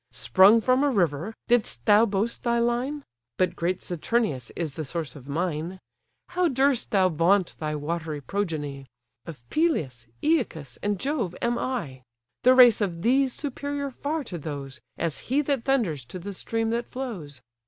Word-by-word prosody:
Sprung 200 +4 +5
from 255 +4 +3
a 290 - +3
river, 180 - 0
didst 220 - +1
thou 215 +3 +6
boast 210 +3 -1
thy 235 -1 +1
line? 245 +5 0 0.3
But 185 - +1
great 175 +2 -1
Saturnius 175 - -1
is 165 -4 -2
the 155 - -4
source 160 +1 -4
of 140 -1 -12
mine. 170 +3 -2 0.5
How 360 0 +1
durst 270 -3 +1
thou 195 -4 +4
vaunt 180 +3 +2
thy 155 -1 -2
watery 155 0 -3
progeny? 145 -6 -3 0.4
Of 130 -8 -10
Peleus, 150 - 0 0.2
Æacus, 195 - 0
and 205 -2 -1
Jove, 245 - -2
am 235 0 0
I. 170 - -3 0.4
The 255 +1 +6
race 245 -4 +7
of 175 -4 -2
these 265 +2 +3
superior 285 +1 -4
far 295 +4 -3
to 180 -9 -6
those, 140 -2 -6 0.2
As 165 -3 -2
he 285 +4 +2
that 275 -4 -1
thunders 215 - +1
to 125 - -8
the 200 +3 -6
stream 225 +3 -2
that 235 +1 -2
flows. 175 - -6
200 Hz, 165 wpm, -26 LUFS, 155-250 Hz, 0.5 s, race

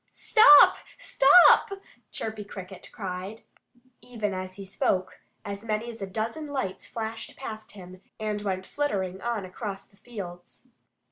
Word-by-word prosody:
"Stop! 430 -3 +7 0.2
Stop!" 315 +7 +6 0.4
Chirpy 220 -1 -5
Cricket 190 -2 -10
called. 190 +2 -6 0.6
Even 215 -5 -4
as 185 0 -6
he 195 0 -9
spoke, 185 -1 -1 0.3
as 200 0 -6
many 225 +1 -3
as 225 -2 -13
a 195 - -4
dozen 225 +10 -4
lights 265 -10 -4
flashed 225 0 -6
past 220 -5 -8
him 185 -2 -12 0.2
and 210 -1 -3
went 190 -2 -3
flittering 190 -11 -3
on 230 -5 -3
across 195 +1 -7
the 200 - -27
fields. 185 -7 -10
210 Hz, 135 wpm, -26 LUFS, 190-230 Hz, 0.6 s, Stop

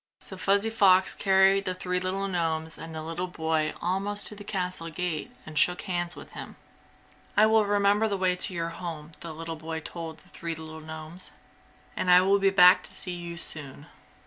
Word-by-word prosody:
So 190 - -3
Fuzzy 200 +3 +2
Fox 190 -4 +4
carried 195 0 +4
the 185 -1 -1
three 180 0 -1
little 190 +2 -2
gnomes 160 -3 -1
and 165 0 -8
the 155 - -4
little 165 +3 -3
boy 160 -3 -1
almost 195 +4 +1
to 210 - -8
the 205 - -10
castle 180 -4 -2
gate 165 -1 -3 0.2
and 155 -1 -2
shook 180 0 +2
hands 175 -2 -2
with - - -11
him. - - -8 0.8
"I 215 - +7
will 220 -1 +4
remember 205 +1 +3
the 200 -2 -1
way 185 -1 +2
to 180 - +2
your 165 -1 -2
home," 165 -2 -7
the 165 - -7
boy 160 0 -5
told 160 0 -7
the - - -22
three 165 -1 -5
little 160 0 -9
gnomes, 160 +3 -8 0.6
"and 180 - -1
I 180 0 +8
will 195 +2 +3
be 195 0 +4
back 180 -1 +7
to - - -8
see 180 - -4
you 170 -1 -7
soon!" 145 -4 -6
180 Hz, 195 wpm, -27 LUFS, 160-195 Hz, 0.8 s, I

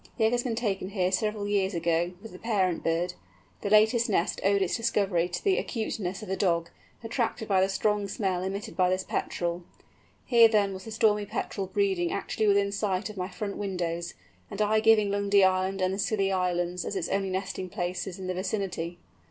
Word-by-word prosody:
The 225 - +1
egg 220 - +3
had 245 0 +1
been 240 -3 -2
taken 200 -5 -2
here 185 -3 0
several 210 +2 -1
years 200 -2 +1
ago, 170 +1 0
with 225 - -9
the 180 - -11
parent 190 -7 0
bird; 170 +2 0 0.5
the 200 - -2
latest 220 +3 +4
nest 180 -4 0
owed 200 0 +3
its 180 - 0
discovery 200 -7 +1
to 175 - -4
the 390 -2 +3
acuteness 215 -4 -3
of 210 - -8
a - - +1
dog, 170 -4 0 0.3
attracted 225 -1 -2
by 190 -2 +3
the 190 - +2
strong 205 +1 0
smell 190 -2 -1
emitted 195 +2 -4
by 180 -1 +3
this 185 0 0
Petrel. 175 -1 -2 0.6
Here 235 -2 +7
then 205 -3 +2
was 190 0 -8
the 225 - -7
Stormy 215 -2 +2
Petrel 195 0 -3
breeding 190 -3 0
actually 220 - -1
within 200 0 +3
sight 200 0 -1
of 210 - -14
my 180 0 -3
front 200 +1 -5
windows, 175 -4 -3 0.3
and 200 - -7
I 215 +1 +3
giving 215 -2 +4
Lundy 200 0 +3
Island 190 0 +2
and 185 +1 +1
the 195 - -4
Scilly 195 -1 +1
Islands 180 -1 0
as - - -4
its 180 -3 -1
only 195 -1 0
nesting 185 0 -3
places 180 +1 -3
in 190 - -7
the 185 - -2
vicinity! 185 -3 -3
195 Hz, 200 wpm, -28 LUFS, 180-210 Hz, 0.6 s, Here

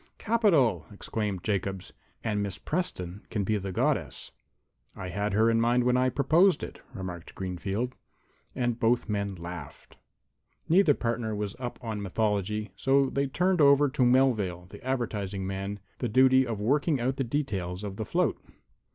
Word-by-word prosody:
"Capital!" 160 - +2
exclaimed 100 -2 -3
Jacobs. 95 -2 -2 0.3
"And 105 -2 0
Miss 100 -2 -3
Preston 105 - -3
can 105 -3 -1
be 105 +2 0
the 95 0 -5
Goddess." - - -1 0.6
"I 95 - -6
had 100 +2 -2
her 110 +3 +4
in 115 0 +3
mind 120 +1 +3
when 125 0 +3
I 130 0 +3
proposed 155 +7 +3
it," - - -8
remarked 90 -4 -7
Greenfield. 95 +6 -3 0.6
And 120 -2 -1
both 120 +2 +2
men 100 -2 -2
laughed. 85 -4 -9 0.7
Neither 170 -4 +5
partner 115 -2 -2
was 105 -1 -3
up 120 -2 -5
on 110 -3 -3
mythology, 105 +1 -1
so 135 +5 +2
they 140 0 0
turned 180 +5 +1
over 140 0 +6
to 130 0 -3
Melvale, 120 -9 +3
the - - -12
advertising 105 -7 -2
man, 95 +1 -4 0.2
the 120 - -1
duty 130 +2 +5
of 115 -3 -3
working 145 +6 +1
out 130 +3 -1
the 135 - 0
details 105 -9 -2
of 100 -1 -5
the 110 - -3
float. - - 0
110 Hz, 160 wpm, -28 LUFS, 100-130 Hz, 0.7 s, over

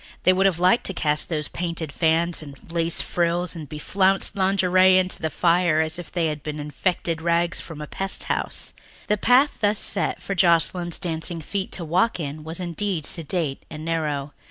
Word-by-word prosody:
They 185 - +5
would 190 +1 +3
have 185 -4 0
liked 180 +7 +3
to 195 - -5
cast 150 -2 0
those 150 -3 -2
painted 165 -3 -4
fans 165 +2 +1
and 140 -3 -10 0.2
lace 165 -1 0
frills 175 +1 0
and 155 -4 -8
beflounced 190 +7 +1
lingerie 185 -1 +4
into 185 0 0
the 160 - 0
fire 170 0 +2
as 160 +1 0
if 175 - -9
they 175 -2 0
had 150 -2 -2
been 150 +1 -5
infected 160 +3 -2
rags 170 +1 +1
from 160 -3 -9
a - - -4
pest 195 +6 -2
house. - - -1 0.4
The 210 - +3
path 250 +7 +3
thus 205 0 +2
set 200 - -1
for 195 - -4
Joscelyn's 175 -1 +2
dancing 165 -1 -2
feet 190 +5 -4
to 170 - -2
walk 185 +7 +1
in 150 0 -5
was 160 +3 -2
indeed 180 -2 -2
sedate 160 -4 -1
and 155 0 -8
narrow. 150 -4 -2
170 Hz, 185 wpm, -23 LUFS, 155-185 Hz, 0.4 s, They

